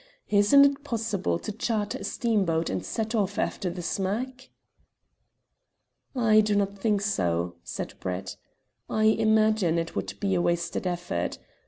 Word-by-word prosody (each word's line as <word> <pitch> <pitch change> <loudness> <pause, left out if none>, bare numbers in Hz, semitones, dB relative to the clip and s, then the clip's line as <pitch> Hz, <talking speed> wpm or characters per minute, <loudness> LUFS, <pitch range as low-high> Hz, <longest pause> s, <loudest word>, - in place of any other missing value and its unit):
Isn't 210 +8 +6
it 280 0 +1
possible 225 - -1
to 215 - -5
charter 215 -1 -2
a - - -7
steamboat 190 -9 0
and 95 - -2
set 220 0 -3
off 205 -3 0
after 190 - -1
the 175 0 -6
smack?" 240 +9 -3 1.7
"I 220 -3 +5
do 210 -1 +1
not 200 0 0
think 205 -1 +1
so," 85 - -1
said - - -5
Brett. 95 +1 -4 0.5
"I 215 - 0
imagine 220 -5 +3
it 165 0 -3
would - - -4
be 195 -2 0
wasted 170 +1 -1
effort. 175 - -2
205 Hz, 140 wpm, -27 LUFS, 170-220 Hz, 1.7 s, Isn't